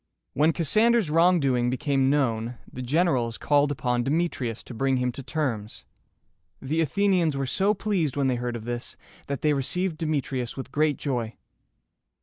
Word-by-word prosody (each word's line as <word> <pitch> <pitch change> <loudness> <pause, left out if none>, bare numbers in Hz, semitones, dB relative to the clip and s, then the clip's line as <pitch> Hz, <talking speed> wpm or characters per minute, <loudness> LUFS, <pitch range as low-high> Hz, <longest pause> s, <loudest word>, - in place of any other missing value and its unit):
When 155 +3 +3
Cassander's 215 +3 +2
wrongdoing 150 -8 +3
became 135 +1 +1
known, 120 -4 0 0.2
the 130 - -6
generals 130 -4 +1
called 145 -1 +2
upon 125 -3 0
Demetrius 135 -6 -1
to - - -10
bring 135 +3 +1
him 125 0 0
to 135 - -7
terms. 130 -7 -3 0.7
The 155 +5 -1
Athenians 175 -2 +1
were 135 - -1
so 195 +10 +1
pleased 185 -9 -1
when 140 - +1
they 130 -2 +1
heard 120 0 -3
of 115 -2 -7
this, 120 0 -5 0.3
that 140 -2 -4
they 150 -1 +3
received 160 +5 -2
Demetrius 140 -6 -2
with 130 - -6
great 150 -1 +1
joy. 120 -5 -3
140 Hz, 155 wpm, -26 LUFS, 125-160 Hz, 0.7 s, When